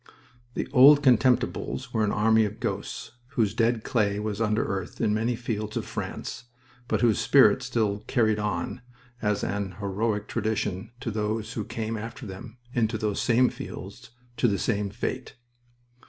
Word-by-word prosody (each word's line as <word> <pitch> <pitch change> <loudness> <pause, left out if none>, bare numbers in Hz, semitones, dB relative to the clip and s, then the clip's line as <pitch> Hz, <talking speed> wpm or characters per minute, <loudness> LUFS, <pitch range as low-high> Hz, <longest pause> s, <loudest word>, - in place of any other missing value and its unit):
The - - -2
"Old 145 +2 +8
Contemptibles" 125 0 +2
were 110 -2 +2
an 100 - +1
army 110 +1 +4
of 105 0 -3
ghosts - - -4 0.3
whose 105 -4 +2
dead 115 0 +1
clay 105 -4 +1
was 105 0 -3
under 110 -1 +1
earth 95 -1 -4
in 110 -2 +2
many 115 +3 0
fields 110 -3 -3
of - - -2
France, - - -5 0.4
but - - 0
whose 115 -3 +3
spirit 130 -3 +5
still 110 -5 0
"carried 110 -4 +2
on" 105 +3 -2 0.4
as 105 -1 0
an 100 0 -2
heroic 105 +1 -1
tradition 110 -1 -2
to 120 - -3
those 110 +1 -2
who 110 - -3
came 110 +1 -4
after 115 +4 -7
them 105 +4 -9 0.2
into 110 -2 +1
those 105 -2 -1
same 125 +1 +4
fields, 110 +6 -9 0.3
to - - +3
the 100 -3 +1
same 100 +1 0
fate. 120 +4 -4
110 Hz, 160 wpm, -27 LUFS, 105-120 Hz, 0.4 s, Old